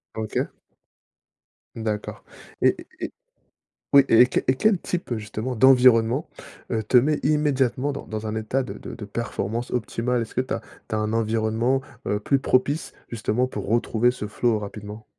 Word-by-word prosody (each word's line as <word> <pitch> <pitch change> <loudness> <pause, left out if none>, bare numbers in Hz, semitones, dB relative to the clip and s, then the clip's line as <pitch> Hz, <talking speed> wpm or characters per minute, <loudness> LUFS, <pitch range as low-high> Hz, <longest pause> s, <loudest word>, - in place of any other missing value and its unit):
OK. 110 -1 -2 1.3
D'accord 110 -2 -4 0.4
et - - +4 0.2
et - - -4 0.8
oui 140 -1 +8
et 120 +2 +7
quel 130 - -1
et 130 - +4
quel 210 +7 +3
type, 175 -3 -4
heu, 120 - -1
justement, 110 +4 -4
d'environnement, 125 +1 +5 0.4
heu, 110 -1 0
te 110 +4 +2
met 145 +5 +4
immédiatement 145 -2 +1
dans 140 - -7
dans 110 0 -5
un 110 - -3
état 110 +5 -1
de - - -7
de - - -8
de 105 - -8
performance 115 +1 -3
optimale? 120 +1 -1
Est-ce 115 - -8
que - - +1
tu 130 - -3
as - - -3 0.3
tu - - -3
as - - +1
un 110 0 -1
environnement, 115 +3 +1 0.3
heu, 105 - 0
plus 135 +6 +2
propice, 140 +3 +1 0.2
justement, 115 +2 0
pour 105 -5 -5
retrouver 120 +2 +2
ce 105 - -5
flow 110 +1 +1
rapidement? 105 +1 -8
115 Hz, 170 wpm, -24 LUFS, 110-130 Hz, 1.3 s, oui